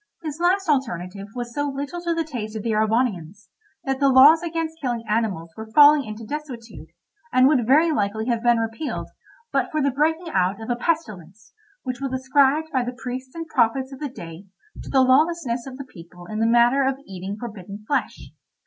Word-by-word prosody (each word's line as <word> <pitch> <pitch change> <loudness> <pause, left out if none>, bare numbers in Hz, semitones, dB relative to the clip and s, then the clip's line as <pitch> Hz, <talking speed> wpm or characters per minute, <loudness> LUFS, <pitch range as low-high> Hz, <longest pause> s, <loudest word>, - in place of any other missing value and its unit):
This 310 -1 -5
last 370 +2 +2
alternative 200 - -2
was 240 -1 -5
so 290 +2 -1
little 285 +5 -5
to 340 -1 -1
the 330 - 0
taste 230 -8 -6
of 215 - -4
the 230 - -1
Erewhonians, 215 -4 -1 0.3
that 270 -1 -2
the 280 -1 +4
laws 280 +5 +7
against 330 -1 -4
killing 240 -4 -2
animals 205 -7 -1
were 220 0 -8
falling 290 -1 +7
into 215 +1 -8
desuetude, 255 -3 -7 0.4
and 255 +1 +5
would 260 -6 +2
very 310 +5 +5
likely 220 -3 -1
have 235 -2 0
been 240 0 +3
repealed, 225 +7 -4 0.4
but - - +1
for 310 - -2
the 280 -1 +1
breaking 320 +5 0
out 185 +2 +1
of 225 +2 -5
a - - +1
pestilence, 215 - -4 0.3
which 255 -1 -5
was 270 -1 -3
ascribed 275 +4 +2
by 260 -2 +2
the 245 +1 -4
priests 255 +2 -6
and 330 0 -5
prophets 265 -2 0
of 265 - -10
the 295 - -4
day 170 -4 -10 0.3
to - - -9
the 265 - +4
lawlessness 260 -2 +2
of 260 -1 -8
the 275 - -7
people 175 -6 -14
in 215 +4 -5
the 225 - +2
matter 240 +3 +4
of 265 0 0
eating 190 +2 -6
forbidden 205 -3 -8
flesh. 280 - -3
255 Hz, 195 wpm, -23 LUFS, 220-290 Hz, 0.4 s, laws